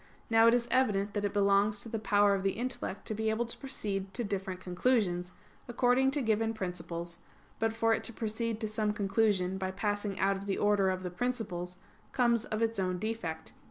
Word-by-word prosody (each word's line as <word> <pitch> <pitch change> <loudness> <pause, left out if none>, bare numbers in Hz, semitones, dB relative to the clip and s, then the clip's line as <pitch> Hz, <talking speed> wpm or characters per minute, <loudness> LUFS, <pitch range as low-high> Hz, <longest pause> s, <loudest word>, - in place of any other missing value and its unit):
Now 225 0 +6
it 230 - +6
is 240 -1 0
evident 210 -6 +2
that 205 -1 -1
it 200 - 0
belongs 200 +1 +3
to - - -6
the 225 - -2
power 205 -1 +4
of 195 - 0
the 195 0 +1
intellect 240 -4 -4
to - - -3
be 220 +1 -1
able 220 +2 0
to 235 - -2
proceed 195 -8 -3
to 240 - -1
different 190 -3 -3
conclusions, 180 -2 0 0.4
according 245 +2 +3
to 280 0 0
given 225 0 +1
principles; 170 -3 -5 0.4
but 225 0 +1
for 225 0 +2
it - - -1
to - - -2
proceed 225 0 -2
to 215 - 0
some 215 0 -1
conclusion 195 -2 +1
by 190 0 -2
passing 205 0 -2
out 195 0 +2
of 200 +1 -8
the 195 - 0
order 205 -2 +3
of 185 0 -2
the 180 - -4
principles, 180 -5 -3 0.4
comes 235 -2 +2
of 215 +1 -1
its 225 -2 0
own 185 -1 0
defect. 175 -6 -4
210 Hz, 205 wpm, -31 LUFS, 190-225 Hz, 0.4 s, Now